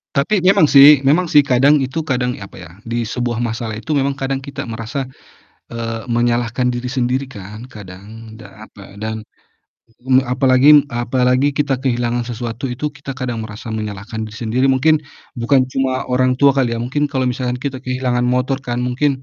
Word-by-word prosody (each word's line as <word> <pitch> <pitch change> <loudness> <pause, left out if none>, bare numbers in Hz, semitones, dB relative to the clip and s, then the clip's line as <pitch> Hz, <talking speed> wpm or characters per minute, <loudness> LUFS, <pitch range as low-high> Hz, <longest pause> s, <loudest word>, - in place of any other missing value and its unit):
Tapi 175 +7 +1
memang 190 -4 +5
sih 140 +1 +8
memang 165 +6 +4
sih 150 - +7
kadang 140 +1 +4
itu 135 +4 -2
kadang 125 -4 -1
apa 100 - -12
ya 85 -3 -11
di 115 0 -3
sebuah 120 0 -2
masalah 115 -2 -3
itu 150 +6 -3
memang 140 0 +1
kadang 135 0 -3
kita 140 -3 -7
merasa, 115 +4 -5 0.7
eee, 115 -1 -4
menyalahkan 120 +1 0
diri 120 0 -4
sendiri 125 +1 -1
kan 105 -2 -10
kadang 110 +1 -12
da 110 -1 -13
apa 100 -1 -14
dan, 110 0 -4 0.8
mmm, 130 0 +2
apalagi 130 +3 +5
apalagi 125 +3 +1
kita 140 -3 0
kehilangan 120 -2 -1
sesuatu 120 +1 -5
itu 130 +4 -3
kita 140 -1 -8
kadang 125 -3 -4
merasa 110 +2 -9
menyalahkan 110 0 -5
diri 110 - -11
sendiri 120 +4 +1
mungkin, 135 +4 +3 0.4
bukan 130 +3 +3
cuma 130 -1 -2
orang 130 0 +2
tua 140 +2 +5
kali 130 -4 0
ya 115 - -3
mungkin 145 +5 -1
kalau 135 -2 -2
misalkan 125 0 -2
kita 130 +1 -4
kehilangan 125 -1 -1
motor 125 +2 0
kan 125 -2 -4
mungkin, 130 +2 -1
125 Hz, 170 wpm, -18 LUFS, 115-135 Hz, 0.8 s, sih